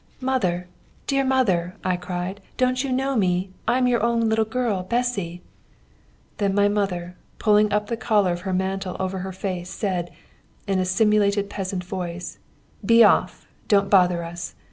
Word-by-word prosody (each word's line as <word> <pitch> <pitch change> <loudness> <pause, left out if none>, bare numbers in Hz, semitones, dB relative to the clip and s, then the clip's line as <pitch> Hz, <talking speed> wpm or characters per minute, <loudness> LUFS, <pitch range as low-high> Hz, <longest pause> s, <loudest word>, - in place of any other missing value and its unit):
'Mother, 190 -10 -1 0.4
dear 275 -1 +1
mother!' 195 -10 +1
I 185 -1 +1
cried, 180 +2 -5 0.2
'don't 255 +1 +1
you 270 - -3
know 265 +1 0
me? 185 -3 +1 0.2
I 240 +2 +3
am 255 - +2
your 245 -1 +2
own 235 0 +2
little 220 0 +2
girl, 220 -4 -1
Bessy!' 195 -5 -2 1.0
Then 200 -2 +1
my 205 0 +4
mother, 185 -4 -2 0.2
pulling 210 -1 +3
up 210 +1 +1
the 230 - -3
collar 205 -6 +2
of 175 - -5
her 190 +1 -3
mantle 190 0 -2
over 190 0 -2
her 190 +1 -5
face, 185 -1 -4
said, 185 -4 -2 0.6
in 195 -2 0
a 185 - +1
simulated 205 +1 +2
peasant 190 -2 -3
voice: 180 -1 -6 0.4
'Be 230 0 +6
off! - - +3 0.2
Don't 200 -2 +3
bother 180 -3 +4
us! 170 +1 -7
195 Hz, 165 wpm, -23 LUFS, 180-225 Hz, 1.0 s, Be